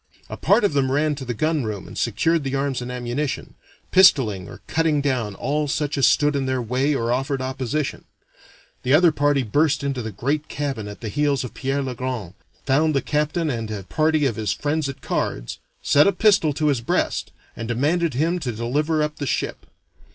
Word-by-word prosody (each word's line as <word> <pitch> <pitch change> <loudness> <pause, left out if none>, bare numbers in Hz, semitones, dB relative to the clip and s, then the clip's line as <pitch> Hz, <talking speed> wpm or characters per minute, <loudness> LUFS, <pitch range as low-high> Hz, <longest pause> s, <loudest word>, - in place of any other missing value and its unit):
A - - -3
part 240 - +3
of 200 - +2
them 135 -2 +1
ran 150 +2 +2
to 140 -2 -6
the 120 -1 -3
gun 155 +4 0
room 105 -4 -4
and - - -10
secured 150 +8 +1
the 135 0 -2
arms 135 -2 -1
and 125 0 -5
ammunition, 125 +3 -3 0.4
pistoling 125 - +5
or - - -11
cutting 160 -2 +1
down 125 -8 -1
all 150 +6 -1
such 145 0 -1
as 140 - +4
stood 145 -1 +3
in 135 -1 -1
their 130 0 0
way 130 +5 0
or 115 -2 -1
offered 135 +2 -1
opposition; 130 +2 -3 0.8
the 130 +3 +3
other 170 +1 +6
party 145 -2 +2
burst 145 +5 +1
into 135 -3 -2
the 110 -1 -5
great 140 +9 -2
cabin 135 -8 -3
at 105 - -9
the 115 - -4
heels 145 +3 +1
of 125 - -7
Pierre 135 +1 -1
le 130 -1 -3
Grand, 125 -7 -4 0.3
found 150 +3 +2
the 135 - +2
captain 150 +2 0
and 115 -3 -4
a 105 -2 -5
party 155 - +1
of 120 -6 0
his 105 -3 -1
friends 145 0 -1
at 135 - -8
cards, - - -3 0.2
set 145 +4 +5
a - - +5
pistol 200 -8 +3
to 150 +1 0
his 135 -5 +1
breast, 115 - -1 0.2
and 115 - -5
demanded 150 +6 0
him 165 +6 +1
to 130 -7 -3
deliver 145 +8 0
up 150 0 -3
the 145 - -3
ship. - - -2
140 Hz, 205 wpm, -23 LUFS, 125-150 Hz, 0.8 s, other